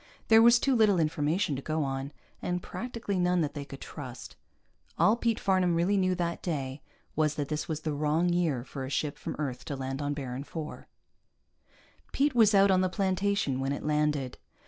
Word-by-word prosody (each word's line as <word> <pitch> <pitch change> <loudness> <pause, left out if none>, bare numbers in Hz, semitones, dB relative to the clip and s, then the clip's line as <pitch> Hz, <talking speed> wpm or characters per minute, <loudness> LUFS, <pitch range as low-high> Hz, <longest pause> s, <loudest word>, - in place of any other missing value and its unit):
There 225 0 +8
was 235 +1 +7
too 270 +2 +1
little 210 -5 +4
information 155 +1 0
to 135 - -5
go 155 +2 -1
on, 135 +1 -3 0.3
and 180 0 -2
practically 230 -5 -4
none 180 0 +2
that 150 -2 -1
they 145 -2 -5
could 135 -1 -10
trust. 130 -5 -8 0.6
All 215 - +5
Pete 235 -1 0
Farnam 185 -3 +2
really 175 +5 +2
knew, 185 -1 +2
that 170 -1 -2
day, 140 -5 -3 0.3
was 155 -1 +1
that 145 -3 -3
this 150 0 -2
was 155 -1 -3
the 155 -1 -2
wrong 155 +4 +1
year 165 -8 +1
for 135 +1 -7
a 130 - -5
ship 145 +1 -1
from - - -6
Earth 130 -4 -4
to 145 - -4
land 135 +1 -4
on 145 0 -2
Baron 130 -2 -5
IV. 155 +2 -7 1.3
Pete 285 +1 +2
was 220 -3 +5
out 195 0 +6
on 185 -1 +4
the 185 - +1
plantation 190 -6 0
when 135 +1 -1
it - - -5
landed. 150 -3 0
155 Hz, 195 wpm, -29 LUFS, 145-190 Hz, 1.3 s, There